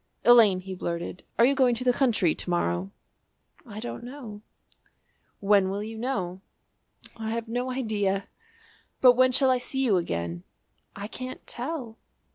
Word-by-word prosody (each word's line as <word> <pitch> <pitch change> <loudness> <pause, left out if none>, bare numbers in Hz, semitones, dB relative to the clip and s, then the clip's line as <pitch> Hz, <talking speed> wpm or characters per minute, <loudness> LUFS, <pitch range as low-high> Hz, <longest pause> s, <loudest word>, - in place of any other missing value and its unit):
"Elaine," 220 -6 +7
he 190 0 -7
blurted, 170 0 -4 0.2
"are 230 - +6
you 275 - +4
going 255 -3 +3
to 240 - -4
the 250 -1 +3
country 225 - +2
to - - -7
morrow?" 90 - 0 0.8
"I 210 -1 -8
don't 240 +1 -6
know." 240 -5 -9 1.0
"When 200 -1 +3
will 200 +2 -3
you 220 +1 -7
know?" 195 -7 -3 0.7
"I 220 -1 -5
have 230 0 -3
no 245 +3 -2
idea!" 205 -6 -1 0.7
"But 250 -1 +7
when 255 +1 +4
shall 265 +1 +3
I 255 - +2
see 265 +2 -2
you 205 -6 +3
again?" 85 - -3 0.5
"I 200 - -6
can't 255 +3 -8
tell." 245 -3 -5
225 Hz, 155 wpm, -27 LUFS, 190-250 Hz, 1.0 s, Elaine